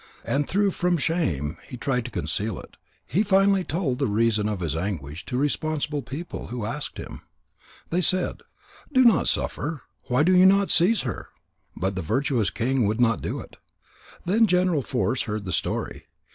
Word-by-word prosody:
And 145 +1 0
though 200 +1 +2
from 180 -1 +1
shame 140 - -1
he 125 - -8
tried 125 -1 -1
to - - -4
conceal 100 +3 -2
it, - - -13 0.3
he 170 - +1
finally 195 -1 +3
told 155 -7 -2
the 140 - +1
reason 110 0 +1
of 105 -3 -3
his 80 -3 -1
anguish 80 -3 -4
to 125 - -2
responsible 150 +1 -1
people 140 +7 -7
who 120 -2 -4
asked 140 +6 -4
him. - - -8 0.7
They 175 +2 +2
said: 185 +2 0 0.5
"Do 260 -2 +5
not 225 - +5
suffer. 150 -1 -1 0.2
Why 125 +4 +2
do 185 +3 +4
you 185 +1 +7
not 195 +1 +4
seize 185 +5 +4
her?" 120 -7 -5 0.5
But 95 +4 -1
the 95 - -3
virtuous 120 - 0
king 125 -1 0
would 110 +3 -1
not 115 -2 +3
do - - -3
it. - - -14 0.7
Then 220 +5 +4
General 180 -5 +2
Force 125 0 -1
heard 105 -1 -3
the 90 - -3
story. - - -3
135 Hz, 175 wpm, -25 LUFS, 110-180 Hz, 0.7 s, you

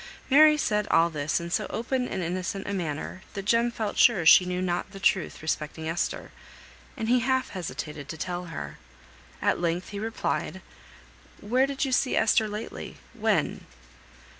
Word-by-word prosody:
Mary 305 +2 +7
said 210 -6 0
all 170 +1 +4
this 150 0 -1
in 170 0 -6
so - - 0
open 250 +2 -1
and 185 - -3
innocent 185 +3 -3
a 205 - -2
manner, 170 0 -4
that 195 -1 -4
Jem 235 +2 +3
felt 220 -3 -3
sure 205 -9 +5
she 180 +3 +8
knew 180 0 -2
not 180 0 -1
the 195 - -8
truth 185 -3 +1
respecting 160 0 -3
Esther, 165 +2 -2 0.7
and 225 -3 -3
he 250 +2 +4
half 260 +1 0
hesitated 150 -5 -6
to 160 - -5
tell 180 +2 -4
her. 165 -3 -7 0.6
At - - +2
length 175 +1 -1
he 205 - -5
replied, 225 +2 -3 0.8
"Where 250 +6 +2
did 275 +1 -1
you 265 - -3
see 255 0 +2
Esther 220 0 +3
lately? 210 +1 -7 0.2
When? - - 0
195 Hz, 165 wpm, -27 LUFS, 170-235 Hz, 0.8 s, she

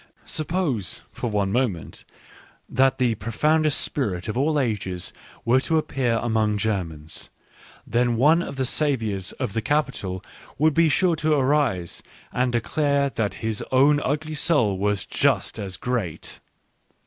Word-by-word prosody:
Suppose, 155 - -1
for 120 - -3
one 100 -2 0
moment, 105 - -2 0.6
that 135 0 +2
the 125 -3 +2
profoundest 150 +8 +1
spirit 95 -11 -2
of 110 - -3
all 150 +4 +2
ages 100 -8 -2 0.3
were 120 +3 +4
to 160 +4 +1
appear 130 -6 0
among 110 -2 +1
Germans, 85 -8 -3 0.6
then 120 0 +1
one 150 +8 +5
of 140 - -5
the 135 -1 0
saviours 115 -10 0
of 125 -7 -4
the 115 - 0
Capitol 120 -9 -1 0.3
would 155 +2 +3
be 165 0 +4
sure 175 +3 +3
to 155 0 +2
arise 130 - +1 0.3
and 125 0 +1
declare 140 +4 +1
that 110 -5 -2
his 110 -2 -1
own 145 +3 +5
ugly 155 +3 -2
soul 145 - +2
was 105 0 0
just - - +1
as 95 -3 -5
great. 115 -10 -3
125 Hz, 140 wpm, -24 LUFS, 105-145 Hz, 0.6 s, one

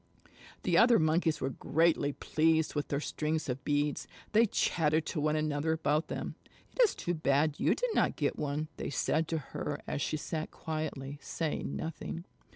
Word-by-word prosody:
The - - +4
other 235 0 +7
Monkeys 160 0 +2
were 135 - -1
greatly 160 0 +2
pleased 160 +2 +1
with 145 -1 -2
their 140 - -1
strings 155 +1 -2
of 130 +1 -3
beads. 145 0 0 0.2
They 225 +2 +5
chattered 160 -5 +1
to 155 - -2
one 155 +1 +2
another 155 0 0
about 155 0 +1
them. - - -4 0.4
"It - - +3
is 465 - +5
too 175 - -2
bad 150 -1 +1
you - - +3
did - - -1
not - - +2
get - - 0
one," 150 +1 -2
they - - -3
said 155 +2 +1
to 165 - -1
her 150 0 -4
as 145 - -3
she 155 - 0
sat 155 +1 -4
quietly, 150 -3 -4
saying 160 -3 -3
nothing. 165 +1 -5
155 Hz, 175 wpm, -31 LUFS, 145-160 Hz, 0.4 s, other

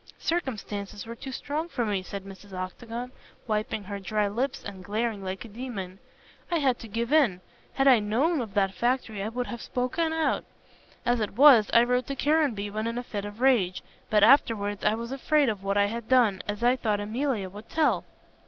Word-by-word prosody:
"Circumstances 210 - -3
were 230 - -6
too 265 +3 -8
strong 300 +5 -3
for 245 -7 -1
me," 205 -3 0
said 195 +1 -7
Mrs. 195 0 -12
Octagon, 230 +7 -5 0.3
wiping 215 -1 -2
her 200 +1 -6
dry 210 +2 0
lips 250 +7 -2
and 195 -2 -8
glaring 215 +1 -2
like 190 +3 -5
a - - -8
demon. 205 -5 -6 0.5
"I 345 - +1
had 265 -5 +1
to 230 - -9
give 230 +5 -2
in. 265 -13 +4 0.3
Had 270 0 +2
I 255 -4 +7
known 255 +10 +1
of 215 -5 -7
that 195 -1 +2
factory 235 -1 -1
I 210 - -2
would 245 +2 -3
have 235 -2 -6
spoken 285 +7 -1
out. 320 -1 0 0.6
As 245 -1 +2
it 210 -2 -3
was, 260 -7 +8
I 235 - +6
wrote 250 0 0
to 275 - -3
Caranby 275 -10 +1
when 215 +2 -2
in 230 +1 -3
a 245 - -3
fit 205 -4 -5
of 205 +3 -8
rage; 225 -9 +3 0.3
but 210 -1 +4
afterwards 215 -5 +4
I 210 +1 +3
was 235 +2 -6
afraid 280 +1 +2
of 205 -3 -4
what 200 +1 0
I 200 - +5
had 225 +2 -5
done, 235 -7 +4
as 210 +2 -3
I 245 +2 +4
thought 215 -4 0
Emilia 220 0 -1
would 205 +4 -11
tell." 315 -1 +2
225 Hz, 205 wpm, -27 LUFS, 205-255 Hz, 0.6 s, was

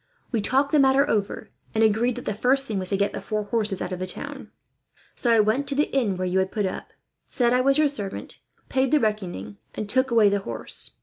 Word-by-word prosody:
We 230 -4 0
talked 270 +6 +1
the 300 - +4
matter 270 +1 +4
over, 205 -5 -1 0.3
and 220 - +3
agreed 225 +3 +2
that 245 - -7
the - - -1
first 260 +6 +2
thing 210 -3 -2
was 185 -1 +2
to 195 - +1
get 200 +1 0
the - - -5
four 215 -1 -2
horses 210 -2 -1
out - - -5
of 180 - -4
the 185 - -3
town. - - -7 0.7
So 240 - 0
I 230 - +5
went 220 +7 +2
to 280 - -2
the 295 -1 0
inn 215 -9 +1
where 185 - -2
you 180 +1 +1
had 190 0 0
put 210 -3 -1
up, 185 - -5 0.4
said 240 -1 +1
I 250 - +3
was 275 +2 +3
your 305 -1 +4
servant, 205 -9 -5 0.3
paid 265 0 +1
the 305 - +5
reckoning, 180 - -3 0.2
and 215 - -4
took 260 +5 +1
away 230 -3 +5
the 200 0 +2
horse. 115 - -6
220 Hz, 245 wpm, -24 LUFS, 200-265 Hz, 0.7 s, I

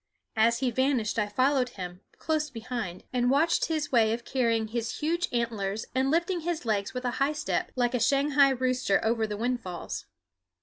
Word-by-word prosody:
As 230 +2 +3
he 255 -2 +1
vanished 250 -3 +1
I 210 - +1
followed 255 +3 +2
him, 180 0 -6 0.2
close 310 -1 -1
behind, 230 -7 -5
and 245 -1 +2
watched 310 +5 +3
his 310 -3 -2
way 225 -3 +4
of 235 +1 -5
carrying 230 -4 0
his 230 -1 -3
huge 340 +3 0
antlers 220 -3 -2
and 260 +1 +1
lifting 345 +4 +1
his 335 -3 -3
legs 210 +1 -1
with 250 0 -4
a 245 - +1
high 280 +2 +3
step, 300 -1 -2
like 245 -1 +1
a 250 - +1
Shanghai 280 +2 +4
rooster, 255 -5 +1
over 225 -1 +1
the 210 -1 -4
windfalls. 185 - -3
245 Hz, 180 wpm, -28 LUFS, 220-275 Hz, 0.2 s, way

